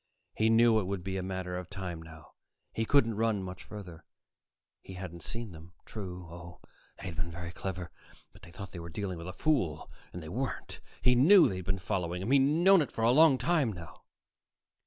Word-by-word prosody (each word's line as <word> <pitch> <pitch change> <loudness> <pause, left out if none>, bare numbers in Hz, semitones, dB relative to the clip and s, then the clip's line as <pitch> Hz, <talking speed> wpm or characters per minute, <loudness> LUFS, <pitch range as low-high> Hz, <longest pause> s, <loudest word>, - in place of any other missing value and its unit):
He 110 +1 +2
knew 115 0 +5
it 95 - -3
would 95 -2 -3
be 95 +1 -3
a - - -2
matter 95 -1 -4
of 90 0 -6
time 90 -4 -5
now. 80 -1 -13 0.4
He 115 - -1
couldn't 115 -5 +3
run 110 -3 +1
much 90 -1 -7
farther. 90 -6 -10 0.8
He 95 - -10
hadn't 90 -2 -7
seen 115 +4 -5
them, 85 +1 -13
true. 90 -4 -7
Oh, 85 0 -11 0.4
they - - -12
had 90 -3 -5
been 85 +1 -2
very 85 +1 -6
clever, 90 -1 -5 0.4
but - - -17
they - - -13
thought 95 +1 -9
they 90 - -7
were 85 0 -7
dealing 90 0 -4
with 85 - -7
a - - -4
fool, 95 - 0 0.2
and 90 - -7
they 80 - -8
weren't. 130 +9 -4 0.2
He 125 - +6
knew 165 +10 +7
they'd 95 -1 -3
been 95 +1 0
following 90 -2 -2
him; 110 - -2
he'd 140 - +6
known 165 +7 +5
it 145 - -2
for 115 - -3
a 115 - +5
long 150 0 +6
time 140 -1 +2
now. 85 -3 -11
95 Hz, 210 wpm, -31 LUFS, 85-115 Hz, 0.8 s, knew